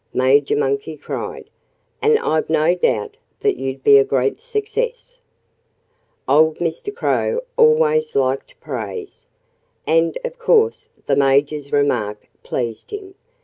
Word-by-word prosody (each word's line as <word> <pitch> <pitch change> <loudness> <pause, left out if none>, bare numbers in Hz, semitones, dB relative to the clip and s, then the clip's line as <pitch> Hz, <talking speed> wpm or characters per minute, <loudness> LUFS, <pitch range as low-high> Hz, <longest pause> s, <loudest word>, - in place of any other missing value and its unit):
Major 135 +2 +3
Monkey 140 +2 -1
cried. - - -6 0.5
"And 445 0 +4
I've 155 - -1
no 160 +2 +3
doubt 425 - -1 0.2
that 415 -1 +1
you'd 135 0 -5
be 140 -1 +7
a - - +5
great 135 -1 0
success." 475 +2 -4 1.1
Old 155 +3 +4
Mr. 170 - -3
Crow 480 +2 0
always 465 0 +3
liked 135 0 -1
praise. 420 -3 -7 0.6
And 165 +1 +2
of - - -6
course 455 -1 +2 0.2
the 140 - +2
Major's 140 +1 +1
remark 105 -8 0
pleased 115 -3 -4
him. 400 -2 -8
160 Hz, 120 wpm, -20 LUFS, -, 1.1 s, be